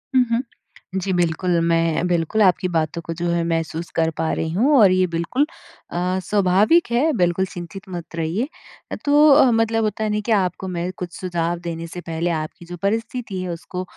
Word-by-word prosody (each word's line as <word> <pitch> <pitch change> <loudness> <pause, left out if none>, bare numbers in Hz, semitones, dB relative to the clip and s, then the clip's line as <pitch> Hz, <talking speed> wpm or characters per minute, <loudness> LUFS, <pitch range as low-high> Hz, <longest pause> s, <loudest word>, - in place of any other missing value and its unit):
हुँ, 255 - +6
हुँ। 230 - +2 0.6
जी 195 - -2
बिल्कुल, 175 0 +1
मैं 165 +1 +1
बिल्कुल 175 +5 +1
आपकी 185 -2 +3
बातों 165 0 -1
को 165 - -3
जो 175 +1 -3
है, 170 0 +1
महसूस 165 0 -2
कर 160 0 +2
पा 160 0 0
रही 160 0 -2
हूँ 265 - +3
और 200 -3 +7
ये 185 0 +3
बिल्कुल 170 - 0 0.5
अ, 180 +2 -1
स्वाभाविक 205 - +3
है, 265 +7 +3
बिल्कुल 175 +1 +2
चिंतित 185 +2 -9
मत 175 -2 -7
रहिए। 170 +10 -1 0.6
तो 295 +1 +6
अ, 275 -2 +7
मतलब 225 0 +1
होता 215 0 -1
है 215 - 0
ना 210 - 0
कि 235 - -1
आपको 190 -2 +1
मैं 180 0 -3
कुछ 180 -4 -6
सुझाव 175 -2 -2
देने 170 -1 -5
से 175 +2 -8
पहले 165 +1 -2
आपकी 155 +1 -5
जो 175 +1 -8
परिस्थिति 225 -1 -2
है, 185 - -4
उसको 180 +2 -5
180 Hz, 195 wpm, -21 LUFS, 170-210 Hz, 0.6 s, और